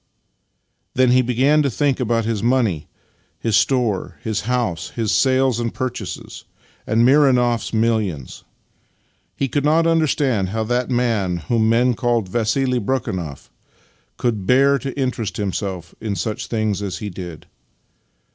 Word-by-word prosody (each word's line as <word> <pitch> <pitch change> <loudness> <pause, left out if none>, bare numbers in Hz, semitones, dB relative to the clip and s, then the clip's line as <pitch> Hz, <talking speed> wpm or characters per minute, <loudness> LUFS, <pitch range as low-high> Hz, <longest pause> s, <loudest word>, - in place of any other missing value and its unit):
" - - -50
Then 130 -1 +4
he 130 +1 +5
began 130 +5 +3
to 140 - +1
think 140 +2 0
about 115 -2 0
his 110 -3 -1
money, 115 - +1 0.5
his 115 -3 0
store, 120 -8 +1
his 110 -2 -1
house, 120 -9 -1
his 115 -3 -1
sales 130 -2 +2
and 115 -1 -1
purchases, 130 -1 -5 0.4
and 115 +2 +3
Mironoff's 125 -4 +3
millions. 110 - -1 0.9
He 135 - -1
could 145 +2 -1
not 160 +3 +3
understand 145 - +1
how 110 +2 -2
that 120 +3 -1
man 115 -8 0
whom 110 +5 +1
men 120 +2 +3
called 115 -4 0
Vassili 120 +4 +1
Brekhunoff 95 - -3 0.7
could 110 -6 -1
bear 140 +2 +4
to 135 +3 -4
interest 120 -7 -2
himself 95 -4 -4
in 105 -3 -2
such 105 +4 -3
things 110 -3 -1
as 95 -3 -3
he 105 -2 -5
did. 90 -3 -8
115 Hz, 140 wpm, -20 LUFS, 105-130 Hz, 0.9 s, he